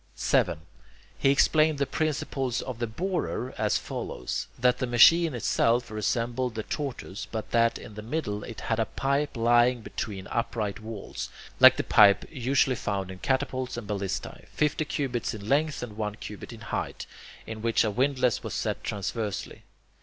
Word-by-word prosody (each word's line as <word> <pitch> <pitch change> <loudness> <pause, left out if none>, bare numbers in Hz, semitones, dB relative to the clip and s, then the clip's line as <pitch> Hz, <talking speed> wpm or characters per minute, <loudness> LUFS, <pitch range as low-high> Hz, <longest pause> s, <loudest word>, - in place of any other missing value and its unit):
7. 85 -3 +1 0.5
He 135 - +2
explained 155 +2 +4
the 140 - +1
principles 140 -5 -1
of 130 -3 -6
the 120 - -1
borer 150 - -2
as - - +1
follows: 75 - -4
that 125 0 +3
the 130 - -1
machine 155 +6 +6
itself 120 0 +1
resembled 120 +3 -1
the 110 - -3
tortoise, 125 -9 -5
but 110 -2 -5
that 115 0 +3
in 110 - -11
the 105 - -7
middle 105 -4 -3
it 115 - -8
had 110 0 -1
a 110 - +1
pipe 140 0 -1
lying 120 +1 +4
between 100 -3 -5
upright 110 -3 -2
walls, 110 -2 -6 0.3
like - - +9
the - - 0
pipe 100 -2 +6
usually 130 -1 +2
found 100 -4 -3
in 95 - -10
catapults 130 -1 -1
and 120 - -5
ballistae, 100 -2 -4
fifty 150 +1 0
cubits 125 -6 -2
in 100 -1 -8
length 145 +2 +1
and 110 -4 -7
one 105 -1 -3
cubit 105 0 -8
in 115 -2 -11
height, 115 - -4 0.4
in 110 -1 -7
which 115 0 +2
a 110 - 0
windlass 130 +1 +1
was - - -5
set - - -2
transversely. 105 +1 -3
120 Hz, 165 wpm, -27 LUFS, 110-135 Hz, 0.5 s, like